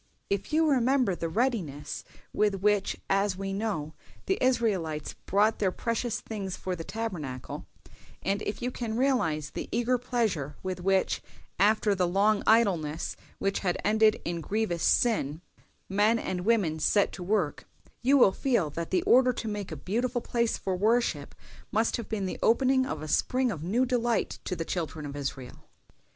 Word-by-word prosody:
"If 200 Hz, 0 st, -1 dB
you 320 Hz, +1 st, +3 dB
remember 260 Hz, -5 st, +3 dB
the 165 Hz, -1 st, -3 dB
readiness 190 Hz, -, -2 dB, 0.3 s
with 210 Hz, -1 st, +2 dB
which, 205 Hz, +1 st, +1 dB
as 195 Hz, -1 st, +1 dB
we 195 Hz, 0 st, -3 dB
know, 195 Hz, -8 st, -2 dB, 0.3 s
the 385 Hz, -, 0 dB
Israelites 195 Hz, -, 0 dB
brought 210 Hz, +3 st, +3 dB
their 195 Hz, -3 st, +2 dB
precious 230 Hz, +2 st, -2 dB
things 195 Hz, -4 st, -5 dB
for 185 Hz, -1 st, -3 dB
the 165 Hz, -, -6 dB
Tabernacle, 165 Hz, -, -5 dB, 0.6 s
and 200 Hz, +2 st, 0 dB
if 210 Hz, -, -4 dB
you 250 Hz, -, -1 dB
can 230 Hz, -3 st, -3 dB
realize 165 Hz, -, +1 dB
the -, -, -5 dB
eager 240 Hz, +2 st, +1 dB
pleasure 215 Hz, -, -1 dB
with 185 Hz, -1 st, -3 dB
which, 190 Hz, +1 st, +1 dB, 0.4 s
after 210 Hz, +1 st, +4 dB
the 185 Hz, -2 st, +1 dB
long 200 Hz, +3 st, +3 dB
idleness 175 Hz, -9 st, +2 dB, 0.2 s
which 195 Hz, 0 st, 0 dB
had 180 Hz, -3 st, 0 dB
ended 215 Hz, +1 st, +4 dB
in 170 Hz, -1 st, -2 dB
grievous 200 Hz, -2 st, -1 dB
sin, 160 Hz, -, +2 dB, 0.5 s
men 210 Hz, +4 st, +3 dB
and 185 Hz, -4 st, -3 dB
women 195 Hz, -9 st, +2 dB
set 200 Hz, +6 st, +3 dB
to -, -, -9 dB
work, 180 Hz, -4 st, -1 dB, 0.4 s
you 275 Hz, +4 st, +4 dB
will 220 Hz, -7 st, +6 dB
feel 200 Hz, -, 0 dB
that 165 Hz, +2 st, -4 dB
the 185 Hz, -, +1 dB
order 255 Hz, 0 st, +5 dB
to 230 Hz, -, -5 dB
make 205 Hz, -3 st, -4 dB
a -, -, -3 dB
beautiful 240 Hz, -, -1 dB
place 235 Hz, -1 st, 0 dB
for 190 Hz, -, -2 dB
worship 210 Hz, -7 st, +1 dB, 0.4 s
must 225 Hz, +2 st, +1 dB
have 235 Hz, -, -7 dB
been 205 Hz, -3 st, -2 dB
the 185 Hz, -, -4 dB
opening 260 Hz, +2 st, +3 dB
of 155 Hz, -1 st, -4 dB
a -, -, -5 dB
spring 255 Hz, -, +1 dB
of 165 Hz, -, -5 dB
new 225 Hz, +9 st, +2 dB
delight 240 Hz, -3 st, 0 dB
to 180 Hz, -, -2 dB
the 165 Hz, -, -4 dB
children 160 Hz, -3 st, -3 dB
of 140 Hz, -1 st, -6 dB
Israel. 135 Hz, -3 st, -6 dB
205 Hz, 170 wpm, -28 LUFS, 175-230 Hz, 0.6 s, will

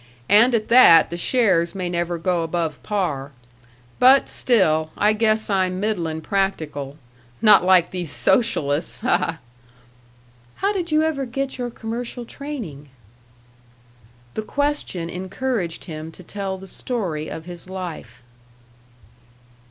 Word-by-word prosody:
And 230 Hz, +5 st, +6 dB
at 215 Hz, -2 st, -1 dB
that, 230 Hz, -11 st, +7 dB
the -, -, -3 dB
shares 180 Hz, -3 st, +2 dB
may 185 Hz, -2 st, -3 dB
never 175 Hz, 0 st, -2 dB
go 175 Hz, 0 st, 0 dB
above 165 Hz, -4 st, -3 dB
par. 150 Hz, -9 st, -2 dB, 0.7 s
But 260 Hz, +2 st, +6 dB
still, 160 Hz, -10 st, +2 dB
I 210 Hz, +1 st, +3 dB
guess 220 Hz, 0 st, +1 dB
I'm 185 Hz, -2 st, 0 dB
middlin' 170 Hz, -7 st, -2 dB
practical 155 Hz, -8 st, -2 dB, 0.4 s
not 210 Hz, -4 st, +6 dB
like 180 Hz, -2 st, +4 dB
these 175 Hz, -4 st, -4 dB
socialists, 165 Hz, -, 0 dB
ha, 250 Hz, -, +3 dB
ha!" 165 Hz, -, -3 dB, 1.2 s
"How 400 Hz, +1 st, 0 dB
did 350 Hz, -4 st, -3 dB
you 310 Hz, 0 st, +3 dB
ever 285 Hz, -4 st, -1 dB
get 270 Hz, +2 st, -4 dB
your 245 Hz, -1 st, -2 dB
commercial 235 Hz, +2 st, -6 dB
training?" 225 Hz, -, -8 dB, 1.4 s
The -, -, -3 dB
question 285 Hz, -, -2 dB
encouraged 185 Hz, +1 st, -3 dB
him 155 Hz, -1 st, -7 dB
to 185 Hz, -, -13 dB
tell 195 Hz, +1 st, -5 dB
the 190 Hz, -, -11 dB
story 185 Hz, -7 st, -3 dB
of 160 Hz, +1 st, -7 dB
his 175 Hz, 0 st, -9 dB
life. 160 Hz, -11 st, -7 dB
190 Hz, 130 wpm, -22 LUFS, 165-235 Hz, 1.4 s, that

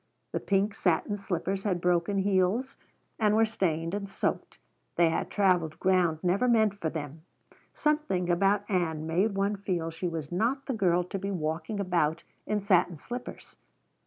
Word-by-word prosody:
The -, -, -1 dB
pink 200 Hz, +1 st, +1 dB
satin 195 Hz, +4 st, 0 dB
slippers 190 Hz, 0 st, -2 dB
had 190 Hz, -4 st, -1 dB
broken 175 Hz, +3 st, +1 dB
heels 195 Hz, +6 st, +1 dB, 0.4 s
and 210 Hz, -1 st, +3 dB
were 225 Hz, +1 st, +5 dB
stained 170 Hz, -6 st, -1 dB
and 200 Hz, -1 st, -3 dB
soaked. -, -, -3 dB, 0.4 s
They 170 Hz, -1 st, +4 dB
had -, -, -2 dB
traveled 180 Hz, -6 st, +1 dB
ground 180 Hz, -4 st, +2 dB
never 190 Hz, +8 st, +2 dB
meant 220 Hz, -4 st, +4 dB
for 160 Hz, -, -1 dB
them. 155 Hz, -1 st, -6 dB, 0.5 s
Something 300 Hz, -, 0 dB
about 195 Hz, +3 st, +2 dB
Ann 160 Hz, -5 st, -1 dB
made 190 Hz, +6 st, +1 dB
one 200 Hz, +1 st, +1 dB
feel 175 Hz, -4 st, -2 dB
she 170 Hz, +3 st, -3 dB
was 160 Hz, -3 st, -5 dB
not 240 Hz, +10 st, 0 dB
the 270 Hz, -, -2 dB
girl 180 Hz, -5 st, +2 dB
to 185 Hz, +2 st, -5 dB
be 200 Hz, +1 st, -3 dB
walking 160 Hz, +2 st, -3 dB
about 170 Hz, -4 st, 0 dB, 0.2 s
in 210 Hz, -1 st, 0 dB
satin 180 Hz, -4 st, +2 dB
slippers. 245 Hz, -, -8 dB
185 Hz, 160 wpm, -28 LUFS, 170-205 Hz, 0.5 s, were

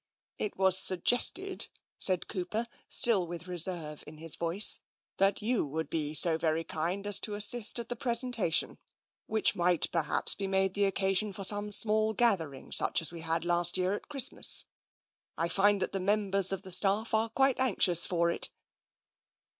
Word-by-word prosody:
" -, -, -66 dB
It 210 Hz, -, -9 dB
was 190 Hz, -1 st, +4 dB
suggested," 245 Hz, -, +1 dB, 0.3 s
said 185 Hz, -2 st, +2 dB
Cooper, 195 Hz, +5 st, -5 dB, 0.2 s
still 200 Hz, -7 st, +4 dB
with 175 Hz, +1 st, -9 dB
reserve 170 Hz, -4 st, 0 dB
in 155 Hz, -, -13 dB
his 160 Hz, 0 st, -5 dB
voice, 170 Hz, +5 st, +1 dB, 0.2 s
" -, -, -70 dB
that 195 Hz, +2 st, 0 dB
you 235 Hz, +1 st, -1 dB
would 160 Hz, +3 st, -7 dB
be 155 Hz, -2 st, -4 dB
so 165 Hz, 0 st, +3 dB
very 160 Hz, 0 st, -2 dB
kind 175 Hz, +6 st, -5 dB
as 205 Hz, -1 st, +3 dB
to 210 Hz, -, -6 dB
assist 210 Hz, +3 st, +3 dB
at 235 Hz, -1 st, -5 dB
the 245 Hz, -, -6 dB
presentation, 235 Hz, -, 0 dB, 0.5 s
which 220 Hz, 0 st, +1 dB
might 175 Hz, -1 st, 0 dB
perhaps 160 Hz, -3 st, +1 dB
be 195 Hz, -, -6 dB
made 190 Hz, -1 st, -1 dB
the 200 Hz, 0 st, -1 dB
occasion 195 Hz, +1 st, -2 dB
for 195 Hz, -, -8 dB
some 205 Hz, +1 st, +2 dB
small 215 Hz, +1 st, +3 dB
gathering 170 Hz, -, -1 dB
such -, -, +3 dB
as 160 Hz, -, -2 dB
we 170 Hz, -1 st, -8 dB
had 165 Hz, +1 st, -3 dB
last 175 Hz, +1 st, +3 dB
year 185 Hz, +1 st, -2 dB
at 205 Hz, -, -8 dB
Christmas. 275 Hz, -4 st, +4 dB, 0.7 s
I 165 Hz, -, -2 dB
find 200 Hz, +3 st, +1 dB
that -, -, -5 dB
the 195 Hz, -, -5 dB
members 195 Hz, -1 st, 0 dB
of 195 Hz, 0 st, -5 dB
the 190 Hz, -, -11 dB
staff 200 Hz, +5 st, 0 dB
are 220 Hz, +1 st, -1 dB
quite 270 Hz, +3 st, -1 dB
anxious 185 Hz, -9 st, +3 dB
for 170 Hz, -1 st, -1 dB
it." -, -, -2 dB
190 Hz, 180 wpm, -28 LUFS, 170-215 Hz, 0.7 s, was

